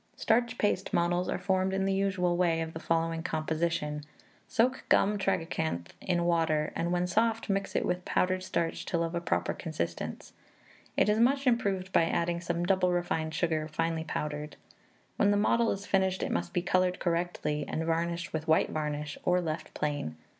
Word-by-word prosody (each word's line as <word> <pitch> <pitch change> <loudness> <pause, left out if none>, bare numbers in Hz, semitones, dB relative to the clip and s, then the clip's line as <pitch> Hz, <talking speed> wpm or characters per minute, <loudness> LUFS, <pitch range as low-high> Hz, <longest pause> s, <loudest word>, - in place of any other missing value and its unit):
Starch 235 +1 +1
paste 200 -2 0
models 175 +1 +1
are - - 0
formed 190 0 0
in 195 0 +1
the 195 - +1
usual 190 -3 +1
way, 170 -2 +2
of 160 0 -4
the 160 - -5
following 165 0 0
composition: 155 -2 -1 0.4
Soak 250 +3 +1
gum 205 +1 +4
tragacanth 160 - -1
in 175 -2 0
water, 160 -3 +1
and 170 +1 -1
when 180 0 +1
soft, 225 +4 +1
mix 195 0 -2
it - - +1
with 180 0 -1
powdered 185 +1 +1
starch 170 -3 -2
till 170 -1 0
of 165 0 -3
a 170 - -1
proper 170 - 0
consistence. 85 - -4 0.6
It - - +4
is 210 +1 +3
much 270 +4 +3
improved 200 -7 +1
by 165 - +5
adding 170 +1 0
some 170 0 -1
double 185 -1 +3
refined 165 -3 -1
sugar 160 -2 0
finely 165 +1 -1
powdered. 150 -1 -4 0.6
When 205 - +4
the 205 - +3
model 230 +3 +3
is 195 +1 -2
finished, 190 -1 +1
it - - -2
must 85 0 -1
be 175 - -1
coloured 185 0 +2
correctly, 170 -4 -1
and 160 - -2
varnished 170 +1 -1
with 160 0 -3
white 160 0 +3
varnish, 150 -1 -3
or 180 0 +3
left 155 -2 -4
plain. 145 - -2
175 Hz, 180 wpm, -30 LUFS, 160-190 Hz, 0.6 s, by